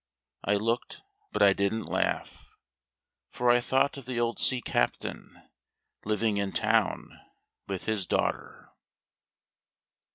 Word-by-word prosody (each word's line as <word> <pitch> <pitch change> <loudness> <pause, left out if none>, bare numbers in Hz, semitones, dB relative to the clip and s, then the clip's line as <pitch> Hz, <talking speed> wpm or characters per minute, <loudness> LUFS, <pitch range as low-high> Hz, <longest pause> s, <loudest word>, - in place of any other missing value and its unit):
I 105 - +2
looked, 115 +4 -2 0.3
but - - +2
I 100 -1 +7
didn't 100 +3 -1
laugh, - - -3 0.7
For 125 0 +2
I 120 0 +4
thought 135 +3 +1
of 135 -3 -10
the 125 -2 -2
old 120 0 -1
sea 130 - +4
captain - - -2 0.6
living 110 0 0
in 100 -1 -1
town - - 0 0.5
with 95 -2 -4
his 110 -4 -1
daughter. - - -2
110 Hz, 120 wpm, -28 LUFS, 100-120 Hz, 0.7 s, I